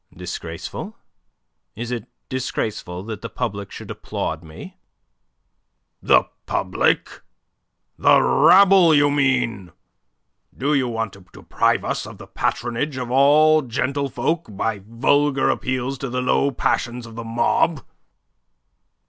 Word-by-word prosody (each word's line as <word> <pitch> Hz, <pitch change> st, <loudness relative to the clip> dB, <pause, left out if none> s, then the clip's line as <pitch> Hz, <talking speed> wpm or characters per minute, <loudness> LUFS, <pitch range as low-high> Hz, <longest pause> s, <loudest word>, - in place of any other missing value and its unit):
"Disgraceful? 85 Hz, -2 st, -7 dB, 0.8 s
Is 120 Hz, +2 st, -5 dB
it 120 Hz, -4 st, -4 dB, 0.2 s
disgraceful 110 Hz, -8 st, -4 dB
that 110 Hz, -1 st, -7 dB
the 115 Hz, -, -6 dB
public 100 Hz, -4 st, -4 dB
should -, -, -9 dB
applaud 80 Hz, +1 st, -4 dB
me?" 80 Hz, -1 st, -12 dB, 1.2 s
"The -, -, +5 dB, 0.2 s
public? -, -, 0 dB, 0.8 s
The -, -, +6 dB
rabble, 190 Hz, -4 st, +6 dB
you 145 Hz, 0 st, +4 dB
mean. 125 Hz, -, 0 dB, 0.9 s
Do 140 Hz, +4 st, 0 dB
you 135 Hz, -3 st, +2 dB
want 115 Hz, -4 st, -3 dB
to 95 Hz, -2 st, -15 dB
deprive -, -, 0 dB
us -, -, -3 dB
of -, -, -11 dB
the -, -, -11 dB
patronage 130 Hz, +4 st, -2 dB
of 125 Hz, -1 st, -4 dB
all 150 Hz, +4 st, +5 dB
gentlefolk 140 Hz, +4 st, -2 dB
by 110 Hz, -3 st, -2 dB
vulgar 135 Hz, +4 st, +2 dB
appeals 130 Hz, +1 st, -3 dB
to 135 Hz, -, -4 dB
the 125 Hz, +1 st, -2 dB
low 140 Hz, +2 st, +2 dB
passions 120 Hz, -2 st, -1 dB
of 115 Hz, -, -11 dB
the 115 Hz, +1 st, -6 dB
mob?" 120 Hz, +7 st, 0 dB
125 Hz, 120 wpm, -21 LUFS, 115-140 Hz, 1.2 s, The